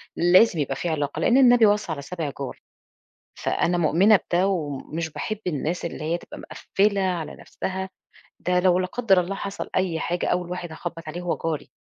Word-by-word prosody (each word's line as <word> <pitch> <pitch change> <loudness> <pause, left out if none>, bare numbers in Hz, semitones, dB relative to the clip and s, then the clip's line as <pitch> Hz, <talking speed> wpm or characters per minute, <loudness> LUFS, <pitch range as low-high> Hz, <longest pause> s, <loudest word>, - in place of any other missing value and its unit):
لازم 175 +1 +5
يبقى 135 -1 -1
في 175 - -3
علاقة، 150 -1 -2
لإن 235 +10 +4
النبي 245 -3 +6
وصى 205 -4 +2
على 140 -3 -4
سابع 155 -1 -4
جار، 135 - -5 0.8
فأنا 175 +1 0
مؤمنة 180 +6 +5 0.2
بده 180 +3 +3
وم 150 -8 -2
مش 165 -1 -2
باحب 215 -1 -4
الناس 165 +2 -2
اللي 160 -2 -5
هي 170 +2 0
تبقى - - -11
مقفلة 200 0 0
على 180 -5 -2
نفسها، 190 0 -5 0.5
ده 180 0 +1
لو 180 -1 +4
لا 185 - 0
قدّر 195 -2 +2
الله 185 +3 -3
حصل 200 0 -5
أي 180 -4 0
حاجة، 175 +1 -1
أول 180 -1 -1
واحد 180 -2 -5
هاخبط 165 0 -7
عليه 170 +3 -5
هو 175 -1 -1
جاري. 160 -3 -2
175 Hz, 190 wpm, -24 LUFS, 160-190 Hz, 0.8 s, النبي